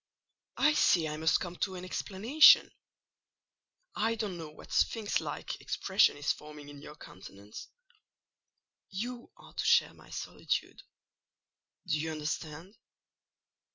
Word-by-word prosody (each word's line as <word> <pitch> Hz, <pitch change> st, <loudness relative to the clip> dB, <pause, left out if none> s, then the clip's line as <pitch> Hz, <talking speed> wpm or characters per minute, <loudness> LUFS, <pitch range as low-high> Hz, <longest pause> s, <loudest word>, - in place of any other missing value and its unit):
"I 300 Hz, -, +4 dB
see 170 Hz, -, +3 dB
I 150 Hz, -, -4 dB
must 160 Hz, +1 st, +2 dB
come 175 Hz, -1 st, -6 dB
to 190 Hz, -, -2 dB
an 180 Hz, 0 st, -7 dB
explanation. 225 Hz, -, +5 dB, 1.2 s
I 225 Hz, +2 st, 0 dB
don't 210 Hz, -4 st, -4 dB
know 165 Hz, -3 st, -7 dB
what 150 Hz, -, -15 dB
sphynx 220 Hz, -3 st, +1 dB
like -, -, -6 dB
expression -, -, +2 dB
is 145 Hz, -, 0 dB
forming 150 Hz, -1 st, -12 dB
in 145 Hz, -1 st, -12 dB
your 150 Hz, -, -11 dB
countenance. 100 Hz, -3 st, -12 dB, 1.2 s
You 240 Hz, +5 st, -6 dB
are -, -, -16 dB
to -, -, -3 dB
share -, -, +4 dB
my -, -, -18 dB
solitude. -, -, -4 dB, 1.0 s
Do 155 Hz, -4 st, 0 dB
you 160 Hz, +1 st, -3 dB
understand?" 155 Hz, +4 st, -5 dB
170 Hz, 125 wpm, -31 LUFS, 150-210 Hz, 1.2 s, explanation